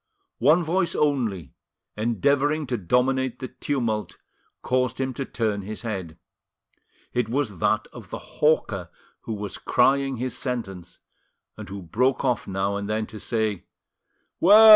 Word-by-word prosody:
One 170 +3 +5
voice 170 +2 +1
only, 115 - 0 0.4
endeavouring 140 - +2
to 125 -1 -1
dominate 125 +5 +1
the 130 -1 -6
tumult, 115 -8 -2 0.5
caused 125 -1 +1
him 130 -1 -1
to 135 +2 -3
turn 110 -5 -1
his 105 +3 -6
head: 95 -8 -4 1.0
it 120 -3 0
was 120 -8 -1
that - - +2
of - - -10
the - - -4 0.2
hawker 105 - +2 0.4
who 115 - -2
was 105 -1 -5
crying 135 0 +3
his 125 +1 -2
sentence, 100 -9 -4 0.6
and - - -9
who 100 -1 -6
broke 125 +11 +1
off 125 -4 +1
now 100 +1 0
and 100 0 -4
then 110 0 0
to 110 - -9
say— 110 -5 -1 0.7
"Well! 215 +5 +9
120 Hz, 140 wpm, -25 LUFS, 100-135 Hz, 1.0 s, Well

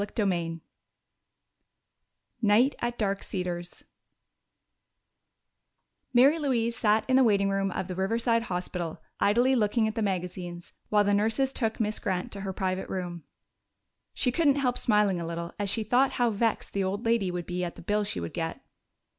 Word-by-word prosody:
CHAPTER 210 +2 -2
X 165 -1 -3 1.8
Night 230 +6 +4
at 240 0 -2
Dark 200 -2 0
Cedars 175 -2 -5 2.3
Mary 270 +6 +5
Louise 235 -5 0
sat 215 -2 +2
in 260 0 +4
the 265 - +6
waiting 200 -4 +3
room 195 0 0
of 180 - -3
the 185 - -4
Riverside 230 +5 +1
Hospital, 180 -3 -4 0.2
idly 240 +6 +3
looking 220 0 +2
at 220 - -2
the 225 - -2
magazines, 180 -3 -4 0.2
while 210 -1 +4
the 205 0 +2
nurses 225 +6 +1
took 225 -3 -1
Miss 215 -1 -1
Grant 185 -2 -2
to 200 - -6
her 195 -1 -3
private 185 0 -2
room. 175 -4 -5 0.9
She 250 - +2
couldn't 285 0 +3
help 255 -3 +1
smiling 210 -5 +2
a 165 - -4
little 170 +1 -5
as 205 -1 0
she 220 +2 0
thought 250 +5 +3
how 240 -2 +2
vexed 220 +1 -1
the 200 - 0
old 200 +4 -2
lady 230 -5 +2
would 175 -1 -4
be 180 0 -3
at 175 - -4
the - - -12
bill 210 +3 +1
she 200 - -3
would 85 -1 -5
get. - - -4
205 Hz, 170 wpm, -28 LUFS, 180-230 Hz, 2.3 s, the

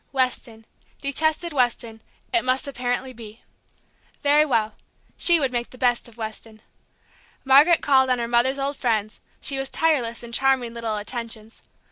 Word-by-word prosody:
Weston, 250 -4 -2 0.3
detested 315 +4 -1
Weston, 240 -4 -1 0.3
it 350 - +3
must 255 +2 +1
apparently 255 0 -3
be. 225 -1 -12 0.8
Very 290 +1 +5
well, 225 -7 0 0.4
she 340 -1 +4
would 270 -3 0
make 240 -1 -2
the 255 - -14
best 245 -1 +1
of 235 -1 -17
Weston. 220 0 -8 0.8
Margaret 290 +6 +6
called 265 -2 +4
on 255 - +2
her 235 -1 -3
mother's 240 +3 +2
old 280 +1 -2
friends; 215 -4 -1 0.2
she 275 -1 -1
was 270 -1 -4
tireless 250 -8 0
in 235 - -10
charming 260 -2 +2
little 230 -2 -3
attentions. 225 0 -5
245 Hz, 150 wpm, -23 LUFS, 230-275 Hz, 0.8 s, Margaret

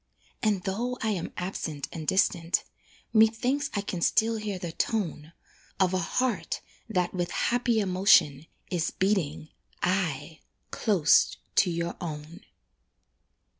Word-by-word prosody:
And 205 -4 +1
though 235 +6 -2
I 220 - +1
am 185 -5 -2
absent 165 -5 -4
and 160 -2 -7
distant, 180 -3 +2 0.5
Methinks 235 +6 +3
I 200 - +1
can 185 -3 -4
still 225 +5 +2
hear 210 -3 -3
the 175 -2 -5
tone 165 -6 -2 0.5
Of 190 -1 +3
a 185 - +2
heart 250 +8 -1 0.3
that, 180 -4 0
with 175 -2 -1
happy 240 -1 +1
emotion, 180 -7 +4 0.2
Is 175 -2 0
beating, 185 -6 -1 0.3
aye! 165 -5 -1 0.3
close 190 -9 +3 0.2
to 185 - +5
your 170 0 -3
own. 155 +1 -6
185 Hz, 125 wpm, -28 LUFS, 165-215 Hz, 0.5 s, to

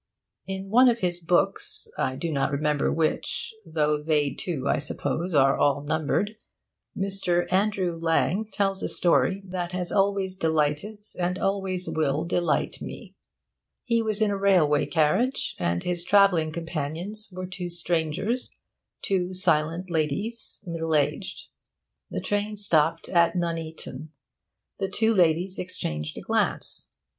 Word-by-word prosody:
In 195 0 -5
one 250 +3 +7
of 235 -1 0
his 175 -1 0
books 175 +1 +1
(I 130 - -1
do 165 +4 -3
not 140 -2 +1
remember 150 0 +1
which, 160 +6 -1
though 150 -3 0
they, 150 -2 +1
too, 145 -6 -3
I - - +2
suppose, 155 +4 -2
are 135 -1 +5
all 145 0 +3
numbered) 160 +8 -1 0.6
Mr. 190 -3 +1
Andrew 190 -3 +1
Lang 165 +6 +1
tells 195 -1 0
a - - -1
story 190 +2 +2
that 180 -1 -4
has 180 -1 0
always 195 -1 +1
delighted 160 +5 0 0.2
and 180 +1 0
always 190 -2 -1
will 155 0 0
delight 175 0 0
me. - - -8 0.7
He 230 -2 +2
was 220 -1 +2
in 210 - +2
a 200 - -1
railway 180 -7 +3
carriage, 175 - +1
and 85 0 0
his 175 -1 -1
travelling 180 -5 +4
companions 170 +6 -4
were 185 0 -5
two 180 -1 -5
strangers, 175 +7 -1 0.5
two 185 -1 0
silent 165 +1 0
ladies, 175 +9 -2
middle 165 -2 -1
aged. 145 -2 -1 0.6
The 90 - -3
train 205 +1 -1
stopped 165 -5 +2
at 170 0 +3
Nuneaton. 160 -4 -4 0.7
The 195 -1 -1
two 220 +3 +2
ladies 180 0 +2
exchanged 75 - -4
a - - -5
glance. - - -1
175 Hz, 135 wpm, -26 LUFS, 155-195 Hz, 0.7 s, one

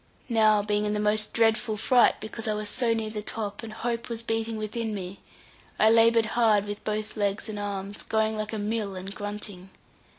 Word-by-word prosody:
Now 215 -3 +4
being 210 0 0
in 210 0 0
the - - -1
most 215 +1 +1
dreadful 225 -1 +2
fright, 245 +3 +4
because 220 +1 -5
I 215 - +1
was 210 0 -3
so 240 0 +1
near 220 -1 -1
the 210 -1 -4
top, 210 -1 -4
and 225 -2 -7
hope 235 +2 -3
was 230 -1 -4
beating 225 0 -1
within 215 0 -3
me, 190 0 -6 0.6
I 220 - +5
laboured 230 0 +5
hard 220 -4 +4
with 205 0 -6
both 215 0 -3
legs 205 0 -1
and 210 -1 -5
arms, 200 0 -4
going 220 0 0
like 215 0 -3
a 220 - -3
mill 210 -1 -2
and 190 +2 -5
grunting. 205 -2 -6
215 Hz, 200 wpm, -27 LUFS, 205-225 Hz, 0.6 s, I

